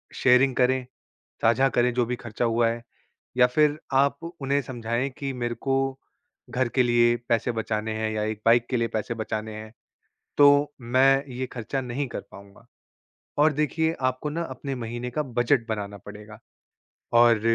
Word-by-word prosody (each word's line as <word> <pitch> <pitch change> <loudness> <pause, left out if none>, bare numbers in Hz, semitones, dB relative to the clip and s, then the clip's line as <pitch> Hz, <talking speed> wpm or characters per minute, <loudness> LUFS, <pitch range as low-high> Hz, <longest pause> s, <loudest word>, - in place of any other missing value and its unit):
Sharing 130 +1 +4
करें, 130 0 +2 0.6
साझा 125 +4 +4
करें 125 -1 +1
जो 120 -1 +1
भी 125 - -2
ख़र्चा 120 0 -4
हुआ 115 0 +2
है। 115 0 -4 0.6
या 125 -1 +6
फिर 150 +3 +2 0.2
आप 140 +1 +3 0.2
उन्हें 140 +1 +1
समझाएँ 120 +1 -2
कि 140 -1 -3
मेरे 120 -1 -3
को 135 +4 -2 0.8
घर 125 -1 0
के 130 - +6
लिए 120 -1 +4
पैसे 115 +1 +1
बचाने 110 -1 -2
हैं 110 0 -2
या 105 -1 -2
1 110 -1 -3
बाइक 120 +1 +5
के 125 - +1
लिए 115 -1 0
पैसे 110 +1 -3
बचाने 110 -1 -4
हैं, 110 0 -9 0.7
तो 145 0 +5
मैं 135 +3 +3
ये 130 +1 -3
ख़र्चा 130 +3 -3
नहीं 130 +3 -3
कर - - -6
पाऊँगा। 100 +3 -15 0.7
और 150 +1 +5
देखिए 160 +2 0 0.2
आपको 140 +4 -5
ना 170 +3 -2
अपने 135 0 -5
महीने 120 +1 -5
का 150 +5 -1 0.2
बजट 120 -1 +2
बनाना 100 -2 -4
पड़ेगा। 105 +1 -11 0.8
और 120 -2 +5
120 Hz, 170 wpm, -25 LUFS, 115-135 Hz, 0.8 s, या